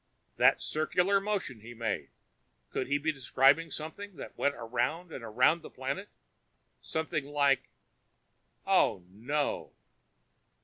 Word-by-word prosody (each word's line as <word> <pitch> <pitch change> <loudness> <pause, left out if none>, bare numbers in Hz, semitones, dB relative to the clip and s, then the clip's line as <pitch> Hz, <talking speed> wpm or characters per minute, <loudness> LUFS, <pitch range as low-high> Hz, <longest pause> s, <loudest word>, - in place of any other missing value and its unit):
"That - - +6
circular 180 +5 +1
motion 195 - -2
he 120 +3 -11
made 110 -3 -2 0.6
could - - -2
he 140 - +1
have 145 - -1
been 155 0 +2
describing 135 +4 +4
something 185 +6 -6
that - - -9
went 140 - +1
around 125 +9 -2
and 130 - -7
around 125 +9 +3
the - - -10
planet? 135 +10 -4 0.7
Something 160 -2 -2
like 140 -2 +2 1.0
oh, 90 -2 +3
no!" 130 +10 -2
145 Hz, 125 wpm, -31 LUFS, 125-160 Hz, 1.0 s, That